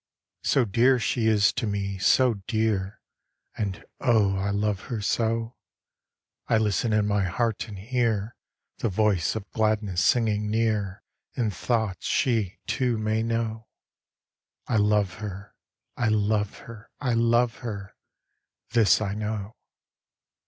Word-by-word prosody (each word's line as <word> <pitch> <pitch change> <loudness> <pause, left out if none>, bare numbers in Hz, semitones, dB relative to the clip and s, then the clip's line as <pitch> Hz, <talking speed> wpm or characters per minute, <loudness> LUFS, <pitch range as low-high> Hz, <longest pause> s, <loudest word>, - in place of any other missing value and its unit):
So 135 -3 +2
dear 120 +5 +4
she 115 0 0
is 105 -2 +4
to 120 -3 -2
me, 100 -1 -2
so 125 +5 +4
dear, 110 -4 -1 0.5
And, 100 -4 -4
oh, 105 -5 +3
I 95 +1 -1
love 100 -1 -1
her 120 -4 -2
so, 115 +2 -1 0.9
I 115 - +3
listen 110 +1 +1
in 105 -1 +2
my 105 -2 +1
heart 115 +5 -1
and 105 -3 -8
hear 115 0 -1 0.4
The 115 - 0
voice 105 -2 +1
of 105 -2 -5
gladness 105 -4 +1
singing 105 -3 +2
near 105 -3 0 0.3
In 115 -5 0
thoughts 110 -3 -1
she, 115 -8 +1
too, 125 -3 0
may 110 +1 0
know. 115 -1 -2 1.0
I 115 - 0
love 105 -3 +2
her, 100 -1 -7 0.4
I 120 - 0
love 105 -1 +1
her, 115 -1 -11
I 125 -4 0
love 115 0 +2
her, 100 -4 -7 0.8
This 115 -4 +4
I 100 -2 -1
know. 105 0 -4
110 Hz, 130 wpm, -26 LUFS, 100-115 Hz, 1.0 s, dear